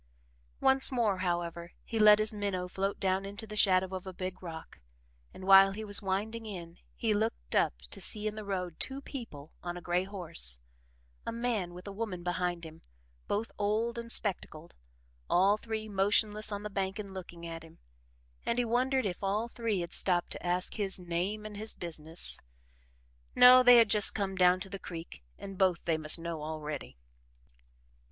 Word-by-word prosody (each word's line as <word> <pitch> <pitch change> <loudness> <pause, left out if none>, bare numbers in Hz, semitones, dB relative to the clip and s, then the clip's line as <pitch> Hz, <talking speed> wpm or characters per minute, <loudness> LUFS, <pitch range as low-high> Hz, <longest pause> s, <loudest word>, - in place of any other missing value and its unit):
Once 265 0 +4
more, 220 -7 +1
however, 175 -1 -3
he 225 - -3
let 210 -1 +8
his 215 +1 +1
minnow 200 -3 -2
float 195 +2 -2
down 190 0 +1
into 200 +3 -7
the 215 0 -8
shadow 190 -2 +3
of 185 0 -7
a - - -4
big 185 0 -6
rock, 165 -3 -9 0.5
and 185 - -10
while 195 0 +8
he 215 +2 -6
was 205 0 +3
winding 215 +4 -2
in, 175 -4 -8 0.2
he 225 -2 +1
looked 210 - -2
up - - +3 0.2
to - - -5
see 210 0 0
in 215 - -1
the 215 0 -7
road 180 -4 -4
two 265 +1 -2
people 225 - -9
on 175 0 -5
a - - -8
gray 175 +1 0
horse, 165 - 0 0.6
a - - -3
man 230 -7 -2
with 180 - -10
a 200 - -6
woman 195 -4 -4
behind 175 -1 -2
him 160 0 -11 0.5
both 215 +3 -1
old 220 +3 0
and 230 0 -5
spectacled 170 -7 -3 0.6
all 195 +3 +4
three 220 0 -5
motionless 210 +2 +2
on 205 0 -4
the 210 - -4
bank 195 0 -2
and 200 -2 -7
looking 175 -2 -8
at 165 -1 -6
him: 160 0 -15 0.7
and 235 - -1
he 245 - +2
wondered 255 +2 +1
if 185 0 -4
all 205 +4 0
three 230 -5 -2
had 170 0 -6
stopped 175 -2 +1
to - - -6
ask 180 +1 0
his 200 -3 +1
name 180 +4 -3
and 210 -1 -7
his 215 +1 -4
business. 165 -1 -3 1.0
No, 250 +1 +9
they 245 -1 +8
had 230 -1 +7
just 210 -2 +4
come 195 -2 -2
down 180 0 +4
to 195 - -5
the 195 - -5
creek 165 - -8 0.2
and 195 -1 -9
both 185 -3 +2
they 165 -2 +1
must 155 +1 +1
know 165 -2 -5
already. 150 - -6
195 Hz, 185 wpm, -31 LUFS, 175-215 Hz, 1.0 s, No